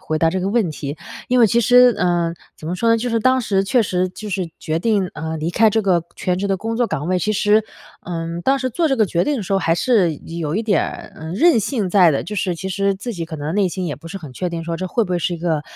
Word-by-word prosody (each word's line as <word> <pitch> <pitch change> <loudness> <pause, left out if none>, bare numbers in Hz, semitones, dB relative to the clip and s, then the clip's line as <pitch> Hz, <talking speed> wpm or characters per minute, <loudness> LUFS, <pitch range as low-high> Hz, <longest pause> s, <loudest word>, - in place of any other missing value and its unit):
回 155 -4 -2
答 165 0 +3
这 190 +1 -2
个 190 - -1
问 210 -6 +1
题。 145 0 -5 0.3
因 255 - +3
为 230 - +7
其 235 +3 +2
实 245 +1 +6
呃， 175 -1 +1 0.2
怎 155 - -10
么 175 - -2
说 230 +6 0
呢， 230 - +5
就 245 +2 -2
是 230 -1 +1
当 260 +3 +3
时 195 -4 +1
确 240 +4 +3
实 185 -2 0
就 210 +3 -8
是 185 -3 -2
决 160 +1 -2
定， 200 -2 0
呃， 160 +1 -4
离 155 +2 -2
开 220 +4 +4
这 220 +1 +1
个 180 -4 +2
全 180 -1 -1
职 200 +1 -2
的 195 - +1
工 225 +3 -4
作 240 0 +1
岗 150 -4 -3
位， 185 0 +1
其 210 +4 0
实， 210 +2 +3 0.4
嗯， 165 0 -4
当 270 +7 +2
时 255 -1 -2
做 330 +5 +1
这 270 - +1
个 220 - +4
决 175 -3 0
定 295 +5 0
的 220 - -3
时 195 - -4
候， 195 - +3
还 165 -2 +1
是 180 -4 +2
有 165 +2 -4
一 225 - 0
点 210 -3 +1
儿， - - -10
呃， 160 +1 -7
任 285 - +4
性 215 -4 -1
在 180 -4 +6
的。 140 - 0
就 210 - -6
是 185 -2 -1
其 190 +3 -5
实 200 +1 +1
自 230 +5 -6
己 170 -4 -5
可 160 - -7
能 150 +3 -4
内 200 -2 +2
心 185 +1 -4
也 150 - -3
不 165 +3 -12
是 195 - -7
很 155 -8 -9
确 180 +7 -3
定 165 -1 -5
说， 170 0 -3
这 185 - -4
会 230 +5 0
不 185 - -8
会 180 - +1
是 175 +2 -1
一 - - -5
个， 160 -3 -1
185 Hz, 325 characters per minute, -20 LUFS, 170-220 Hz, 0.4 s, 为